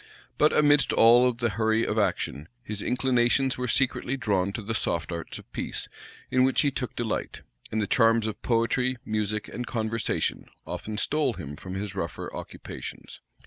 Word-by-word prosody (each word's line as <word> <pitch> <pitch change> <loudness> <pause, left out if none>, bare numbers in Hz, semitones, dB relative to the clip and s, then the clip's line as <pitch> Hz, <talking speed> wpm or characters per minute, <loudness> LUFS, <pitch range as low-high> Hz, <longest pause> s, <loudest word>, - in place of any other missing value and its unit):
But 150 - +5
amidst 145 -1 +4
all 120 +2 +6
the 120 -1 -1
hurry 110 +2 +1
of 110 - 0
action, 85 -6 -1 0.2
his 105 -2 -4
inclinations 125 +1 +2
were 125 - -1
secretly 130 +1 +1
drawn 100 -6 0
to 110 - -5
the 115 +3 -2
soft 85 -7 -1
arts 85 -1 -5
of - - -14
peace, - - -3 0.4
in 130 0 +4
which 130 0 +3
he 145 - +2
took 125 -3 -4
delight; 120 -2 -3 0.3
and 110 - 0
the 105 - +1
charms 115 +1 +3
of 110 - -4
poetry 125 +2 +1
music, 105 0 -1
and 125 0 -5
conversation 115 -1 -1 0.2
often 110 0 -5
stole 145 +2 +1
him 75 -7 -7
from 95 +4 -7
his 100 0 -4
rougher 85 -4 -5
occupations. - - -8
115 Hz, 170 wpm, -27 LUFS, 105-125 Hz, 0.4 s, all